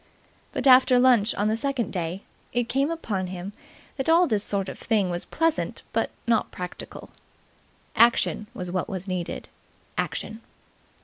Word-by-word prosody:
But -, -, -3 dB
after 255 Hz, -1 st, +7 dB
lunch 245 Hz, -4 st, +4 dB
on 205 Hz, +1 st, +1 dB
the 215 Hz, -, +2 dB
second 270 Hz, -1 st, -2 dB
day 180 Hz, +1 st, -3 dB, 0.3 s
it 245 Hz, -1 st, 0 dB
came 275 Hz, +4 st, +1 dB
upon 210 Hz, -, -2 dB
him 185 Hz, +2 st, -6 dB, 0.4 s
that 265 Hz, +2 st, -1 dB
all 335 Hz, +2 st, +6 dB
this 215 Hz, -, +1 dB
sort 195 Hz, -2 st, -1 dB
of -, -, -7 dB
thing 205 Hz, -6 st, +1 dB
was 175 Hz, 0 st, -3 dB
pleasant 325 Hz, 0 st, -1 dB
but -, -, +1 dB, 0.2 s
not 230 Hz, -2 st, +2 dB
practical. 180 Hz, -1 st, -8 dB, 0.8 s
Action 230 Hz, -2 st, +3 dB
was 180 Hz, -1 st, -5 dB
what 185 Hz, -1 st, -2 dB
was 190 Hz, 0 st, -5 dB
needed. 180 Hz, -2 st, -4 dB, 0.5 s
Action. 220 Hz, +1 st, -3 dB
215 Hz, 150 wpm, -25 LUFS, 185-255 Hz, 0.8 s, after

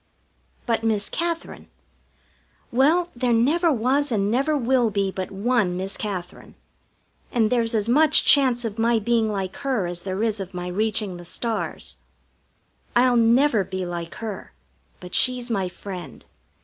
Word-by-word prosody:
But 225 Hz, -1 st, -1 dB
Miss 215 Hz, -3 st, 0 dB
Katherine 335 Hz, -1 st, -4 dB, 1.0 s
well, 320 Hz, +8 st, +2 dB
there 245 Hz, 0 st, 0 dB
never 315 Hz, +9 st, +3 dB
was 265 Hz, +3 st, +1 dB
and 205 Hz, -2 st, 0 dB
never 275 Hz, +5 st, +1 dB
will 250 Hz, -2 st, +2 dB
be 200 Hz, -2 st, -1 dB
but 190 Hz, -1 st, -5 dB
one 200 Hz, -2 st, 0 dB
Miss 190 Hz, +1 st, -3 dB
Katherine, 185 Hz, -4 st, -6 dB, 0.8 s
and 225 Hz, -2 st, +1 dB
there's 230 Hz, -2 st, +1 dB
as 215 Hz, -1 st, 0 dB
much 300 Hz, +6 st, +5 dB
chance 255 Hz, -4 st, +4 dB
of 220 Hz, 0 st, -5 dB
my 230 Hz, +1 st, +3 dB
being 225 Hz, 0 st, +1 dB
like 195 Hz, -2 st, -4 dB
her 260 Hz, -9 st, -1 dB
as 175 Hz, 0 st, -4 dB
there 190 Hz, +3 st, -3 dB
is 220 Hz, -2 st, -1 dB
of 190 Hz, -1 st, -7 dB
my 180 Hz, 0 st, -4 dB
reaching 210 Hz, -1 st, 0 dB
the 175 Hz, -, -10 dB
stars. 225 Hz, +6 st, -4 dB, 1.0 s
I'll 245 Hz, 0 st, +4 dB
never 235 Hz, 0 st, +3 dB
be 185 Hz, 0 st, -5 dB
like 170 Hz, -1 st, -6 dB
her, 220 Hz, -3 st, -7 dB, 0.5 s
but 180 Hz, -1 st, -11 dB
she's 250 Hz, -1 st, +2 dB
my 195 Hz, -4 st, -1 dB
friend. 185 Hz, -1 st, -9 dB
225 Hz, 150 wpm, -23 LUFS, 195-250 Hz, 1.0 s, much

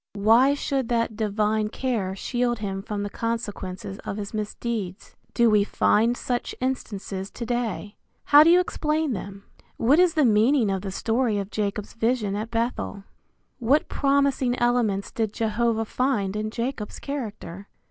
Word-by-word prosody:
Why 230 Hz, +7 st, +5 dB
should 270 Hz, -3 st, -2 dB
that 230 Hz, -2 st, 0 dB
divine 215 Hz, 0 st, 0 dB
care 215 Hz, -7 st, -2 dB
shield 240 Hz, +3 st, -1 dB
him 195 Hz, -2 st, -4 dB
from 205 Hz, 0 st, -4 dB
the 205 Hz, -, -3 dB
consequences 205 Hz, -4 st, -4 dB
of 195 Hz, -, -5 dB
his 205 Hz, 0 st, -5 dB
misdeeds? 215 Hz, -2 st, -4 dB, 0.2 s
Do 235 Hz, -1 st, +4 dB
we 210 Hz, -2 st, +4 dB
find 230 Hz, +3 st, +2 dB
such 245 Hz, -1 st, -3 dB
instances 200 Hz, -7 st, -3 dB
to 235 Hz, -, -6 dB
day? 230 Hz, -3 st, -3 dB, 0.3 s
How 290 Hz, +1 st, +7 dB
do 325 Hz, -, +5 dB
you 350 Hz, +1 st, +7 dB
explain 310 Hz, -4 st, 0 dB
them? 195 Hz, 0 st, -7 dB, 0.3 s
What 270 Hz, +8 st, +4 dB
is 360 Hz, -3 st, +4 dB
the 305 Hz, -3 st, +4 dB
meaning 225 Hz, +1 st, +3 dB
of 190 Hz, -1 st, -1 dB
the 195 Hz, -1 st, -5 dB
story 225 Hz, +2 st, 0 dB
of 200 Hz, 0 st, -4 dB
Jacob's 205 Hz, -1 st, -3 dB
vision 225 Hz, -3 st, 0 dB
at 215 Hz, +2 st, -4 dB
Bethel? 230 Hz, -3 st, -2 dB, 0.6 s
What 265 Hz, +5 st, +2 dB
promising 275 Hz, -3 st, +1 dB
elements 235 Hz, -5 st, +1 dB
did 220 Hz, -2 st, -2 dB
Jehovah 225 Hz, 0 st, 0 dB
find 215 Hz, -5 st, 0 dB
in 215 Hz, 0 st, -2 dB
Jacob's 230 Hz, -1 st, -4 dB
character? 210 Hz, -9 st, -6 dB
225 Hz, 155 wpm, -25 LUFS, 205-250 Hz, 0.6 s, How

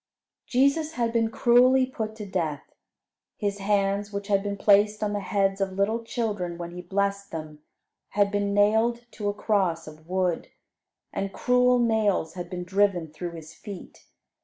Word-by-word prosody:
Jesus 280 Hz, +5 st, +2 dB
had 235 Hz, -3 st, -1 dB
been 225 Hz, -1 st, +2 dB
cruelly 250 Hz, +2 st, +5 dB
put 220 Hz, -4 st, -5 dB
to 215 Hz, -1 st, -7 dB
death. 165 Hz, -7 st, -2 dB, 0.7 s
His 205 Hz, -1 st, -2 dB
hands, 200 Hz, 0 st, 0 dB
which 200 Hz, 0 st, -5 dB
had 200 Hz, -1 st, +3 dB
been 200 Hz, 0 st, -3 dB
placed 210 Hz, +1 st, +4 dB
on 205 Hz, -1 st, -1 dB
the 205 Hz, -, -1 dB
heads 195 Hz, -1 st, 0 dB
of 190 Hz, -1 st, -1 dB
little 210 Hz, +4 st, 0 dB
children 205 Hz, -7 st, -3 dB
when 170 Hz, 0 st, -6 dB
He 180 Hz, +1 st, -7 dB
blessed 200 Hz, +2 st, -1 dB
them, 155 Hz, -2 st, -7 dB, 0.6 s
had 200 Hz, -1 st, +3 dB
been 205 Hz, 0 st, 0 dB
nailed 220 Hz, +4 st, +2 dB
to 205 Hz, -3 st, -3 dB
a -, -, -1 dB
cross 195 Hz, -6 st, 0 dB
of 155 Hz, +1 st, -13 dB
wood; 185 Hz, -2 st, 0 dB, 0.7 s
and 195 Hz, 0 st, -2 dB
cruel 250 Hz, +3 st, +3 dB
nails 220 Hz, -8 st, +1 dB
had 175 Hz, -1 st, -6 dB
been 180 Hz, 0 st, -4 dB
driven 185 Hz, -3 st, +1 dB
through 175 Hz, +1 st, -5 dB
his 160 Hz, -1 st, -10 dB
feet. 200 Hz, -4 st, -11 dB
200 Hz, 165 wpm, -26 LUFS, 185-220 Hz, 0.7 s, cruelly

